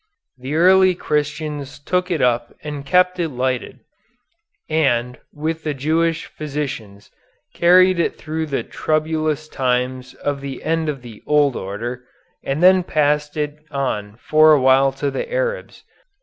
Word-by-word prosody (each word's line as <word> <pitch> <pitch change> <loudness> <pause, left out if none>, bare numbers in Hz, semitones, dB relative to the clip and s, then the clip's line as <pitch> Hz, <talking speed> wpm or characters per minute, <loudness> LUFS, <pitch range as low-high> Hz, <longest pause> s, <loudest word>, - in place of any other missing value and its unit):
The 130 +4 -4
early 185 +2 +5
Christians 150 -2 -3
took 180 +5 -1
it 170 -4 0
up 120 -1 +1
and 145 -2 -5
kept 180 +4 +2
it 165 -2 0
lighted, 130 -1 -3 0.9
and, 125 -6 0
with 160 +2 -3
the 150 -2 -2
Jewish 160 +4 0
physicians, 135 -9 -6 0.4
carried 185 +1 +5
it 170 - 0
through 160 +1 -4
the 140 - -2
troublous 155 0 -1
times 125 -1 -2
of 145 -1 -3
the 135 -2 -7
end 160 0 0
of 135 -4 -5
the 115 -3 -11
old 145 -3 +3
order, 115 +6 -5 0.4
and 140 +5 -2
then 185 0 +7
passed 150 -2 0
it 150 0 -3
on 105 -7 -3
for 155 +4 +5
a 150 - +5
while 135 +1 +4
to 140 +1 -2
the 480 - -4
Arabs. - - -3
150 Hz, 145 wpm, -20 LUFS, 130-160 Hz, 0.9 s, then